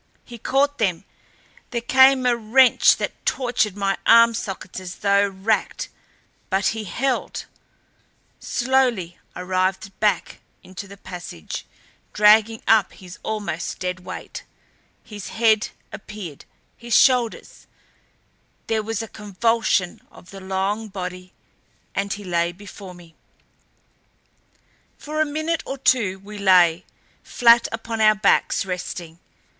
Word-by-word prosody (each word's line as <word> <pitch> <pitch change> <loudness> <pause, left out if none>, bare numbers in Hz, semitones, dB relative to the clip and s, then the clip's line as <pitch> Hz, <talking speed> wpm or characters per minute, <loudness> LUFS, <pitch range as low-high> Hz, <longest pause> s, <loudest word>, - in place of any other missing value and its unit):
He 235 -1 -11
caught 280 +5 +1
them. 195 -5 0 0.7
There 240 - -2
came 265 +2 +5
a 245 -1 +3
wrench 235 +3 +4
that - - -5
tortured 240 -6 0
my 195 -1 -1
arm 230 0 +7
sockets 195 -4 -6
as 185 -1 -8
though 200 0 +2
racked. 195 +3 -2 0.6
But 190 0 +1
he 220 -1 -4
held! 255 +7 -2 0.9
Slowly 245 -9 0 0.2
I - - -6
writhed 185 +1 -1
back 210 -1 0 0.2
into 190 +2 -9
the 200 +1 -12
passage, 180 - -8 0.5
dragging 215 +1 +4
up 220 -4 +4
his 180 0 -12
almost 210 -6 -4
dead 180 0 -3
weight. 180 - -8 0.6
His 210 -4 -9
head 220 0 +2 0.2
appeared, 200 -8 -9 0.3
his 235 -1 +1
shoulders; 250 -4 +1 1.0
there 220 -1 0
was 225 +1 -3
a - - -7
convulsion 210 -2 0
of 180 - -16
the 195 -1 -10
long 195 +3 -2
body 185 -2 -7 0.6
and 200 0 -2
he 205 0 -4
lay 170 -2 0
before 195 0 -11
me. 170 -2 -16 1.8
For 305 +1 -3
a - - +3
minute 315 +2 -2
or 270 - -6
two 230 -8 +2
we 205 +2 -10
lay, 180 -3 +4 0.4
flat 235 0 +4
upon 225 0 -4
our 215 0 +6
backs 205 -1 +2
resting. 175 -2 -6
210 Hz, 125 wpm, -22 LUFS, 185-230 Hz, 1.8 s, arm